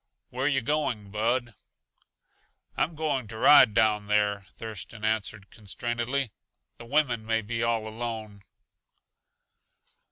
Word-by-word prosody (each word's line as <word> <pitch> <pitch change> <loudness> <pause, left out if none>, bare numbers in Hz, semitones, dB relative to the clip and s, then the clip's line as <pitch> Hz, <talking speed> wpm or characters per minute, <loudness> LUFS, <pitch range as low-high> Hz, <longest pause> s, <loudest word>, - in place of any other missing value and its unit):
Where 130 +3 -1
yuh 135 -2 +2
going, 120 -7 -1
Bud?" 120 +3 0 1.2
"I'm 165 - 0
going 145 -6 -1
to 110 +1 -8
ride 125 -3 +7
down 105 -1 +3
there," 105 -2 +1
Thurston 110 0 -7
answered 110 -2 -2
constrainedly. 120 +4 -3 0.5
"The 115 - -11
women 125 -3 +1
may 115 0 0
be 115 +2 -3
all 115 -2 0
alone." 110 -2 -6
115 Hz, 115 wpm, -27 LUFS, 105-125 Hz, 1.2 s, ride